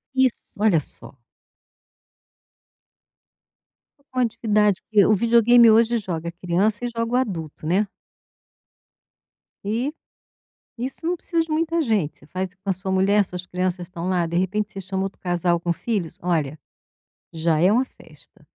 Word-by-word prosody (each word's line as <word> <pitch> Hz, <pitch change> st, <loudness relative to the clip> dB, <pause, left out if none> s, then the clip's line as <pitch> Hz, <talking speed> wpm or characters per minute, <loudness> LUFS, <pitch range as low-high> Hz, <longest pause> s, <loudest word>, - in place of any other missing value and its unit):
Isso, 260 Hz, -2 st, +2 dB
olha 205 Hz, -5 st, +4 dB
só. 135 Hz, -, -11 dB, 2.9 s
Com 255 Hz, -, -2 dB
a -, -, +4 dB
atividade 210 Hz, -3 st, +1 dB
fí 210 Hz, -3 st, +5 dB
o 215 Hz, -, +4 dB
videogame 235 Hz, +2 st, +6 dB
hoje 230 Hz, +2 st, +4 dB
joga 170 Hz, -5 st, -4 dB
criança 185 Hz, +6 st, 0 dB
e -, -, -1 dB
joga 230 Hz, 0 st, -3 dB
o -, -, +3 dB
adulto, 165 Hz, -, -3 dB
né. 190 Hz, +6 st, +2 dB, 1.8 s
E 235 Hz, +8 st, -1 dB, 0.8 s
isso 260 Hz, +7 st, -5 dB
não 350 Hz, +2 st, +1 dB
precisa 335 Hz, -1 st, 0 dB
de 325 Hz, -, -9 dB
muita 330 Hz, +1 st, +1 dB
gente, 210 Hz, -, 0 dB
você -, -, -18 dB
faz 185 Hz, +2 st, -4 dB
com 195 Hz, +1 st, -8 dB
a -, -, +3 dB
sua 190 Hz, +1 st, -4 dB
mulher, 195 Hz, +2 st, +3 dB
suas 180 Hz, 0 st, -7 dB
crianças 180 Hz, -1 st, -2 dB
estão 175 Hz, -1 st, -6 dB
lá, 180 Hz, -2 st, +1 dB
de 170 Hz, +1 st, -2 dB
repente 205 Hz, +3 st, -1 dB
você 195 Hz, -, -7 dB
chama 190 Hz, 0 st, -3 dB
outro 195 Hz, 0 st, -6 dB
casal 175 Hz, -1 st, 0 dB
com 170 Hz, 0 st, -1 dB
filhos. 190 Hz, -4 st, -3 dB
Olha, 160 Hz, -4 st, -1 dB, 0.7 s
já 160 Hz, -1 st, +1 dB
é 180 Hz, +4 st, +5 dB
uma 250 Hz, +4 st, +3 dB
festa. -, -, -20 dB
195 Hz, 150 wpm, -23 LUFS, 175-230 Hz, 2.9 s, videogame